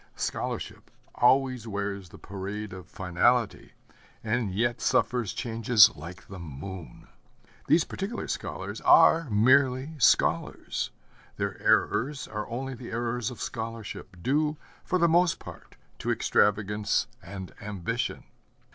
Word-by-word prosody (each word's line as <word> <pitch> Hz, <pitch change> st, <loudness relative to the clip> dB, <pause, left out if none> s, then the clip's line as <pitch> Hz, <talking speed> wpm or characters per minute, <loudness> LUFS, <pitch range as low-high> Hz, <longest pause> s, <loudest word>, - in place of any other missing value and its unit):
Scholarship -, -, -4 dB, 0.2 s
always 130 Hz, -2 st, +3 dB
wears 100 Hz, -3 st, -4 dB
the -, -, -13 dB
parade 100 Hz, +1 st, -6 dB
of 95 Hz, -1 st, -10 dB
finality, 95 Hz, +6 st, 0 dB, 0.5 s
and 115 Hz, -2 st, 0 dB
yet 120 Hz, +5 st, 0 dB
suffers 120 Hz, -4 st, +1 dB
changes 115 Hz, -3 st, +4 dB
like 85 Hz, +5 st, -10 dB
the 95 Hz, -1 st, -9 dB
moon. 85 Hz, +3 st, -9 dB, 0.6 s
These 165 Hz, -, +5 dB
particular 200 Hz, +5 st, -5 dB
scholars -, -, -5 dB
are 165 Hz, -3 st, +6 dB
merely 130 Hz, +6 st, +3 dB
scholars. 115 Hz, -, +2 dB, 0.5 s
Their -, -, -3 dB
errors 145 Hz, +3 st, +2 dB
are 105 Hz, -1 st, -5 dB
only 130 Hz, +3 st, -4 dB
the 125 Hz, -1 st, -9 dB
errors 120 Hz, 0 st, -2 dB
of 125 Hz, -, -10 dB
scholarship, 110 Hz, -4 st, -6 dB
due, 150 Hz, +3 st, +1 dB, 0.3 s
for 185 Hz, -, 0 dB
the 170 Hz, -1 st, +4 dB
most 170 Hz, +1 st, +3 dB
part, -, -, -12 dB, 0.2 s
to -, -, -3 dB
extravagance 105 Hz, 0 st, +2 dB, 0.2 s
and 95 Hz, 0 st, -8 dB
ambition. 105 Hz, +4 st, -3 dB
115 Hz, 120 wpm, -28 LUFS, 100-130 Hz, 0.6 s, are